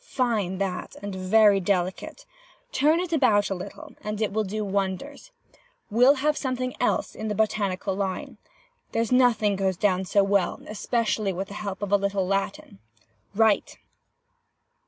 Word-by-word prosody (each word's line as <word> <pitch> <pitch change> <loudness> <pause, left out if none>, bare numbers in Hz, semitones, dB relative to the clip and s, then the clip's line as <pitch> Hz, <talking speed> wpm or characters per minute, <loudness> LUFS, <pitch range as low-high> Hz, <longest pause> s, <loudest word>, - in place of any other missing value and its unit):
Fine 225 - -1
that, 190 -2 -3
and 205 -1 -4
very 200 +2 +4
delicate! 190 - -2 0.5
Turn 305 +5 +3
it 355 -2 -3
about 215 -10 +3
a - - +2
little, 270 - -9
and 210 0 -4
it 215 -3 -1
will 220 +1 +1
do 210 +2 -3
wonders. 195 - -3 0.6
We'll 250 +6 +6
have 300 +2 +1
some 260 -3 -2
thing 255 0 -3
else 245 - 0
in 220 - -5
the 210 - -2
botanical 200 -2 0
line. 190 -1 -4 0.5
There's 230 0 0
nothing 235 -5 +3
goes 190 -2 0
down 190 -1 +1
so 200 +2 +3
well, 200 -1 +1
especially 215 -2 -1
with 190 +2 -4
the - - -8
help 200 -1 -5
of 205 - -3
a 205 - +6
little 200 -1 -1
Latin. 195 - -3 0.6
Write! 220 -1 +2
205 Hz, 155 wpm, -25 LUFS, 195-235 Hz, 0.6 s, We'll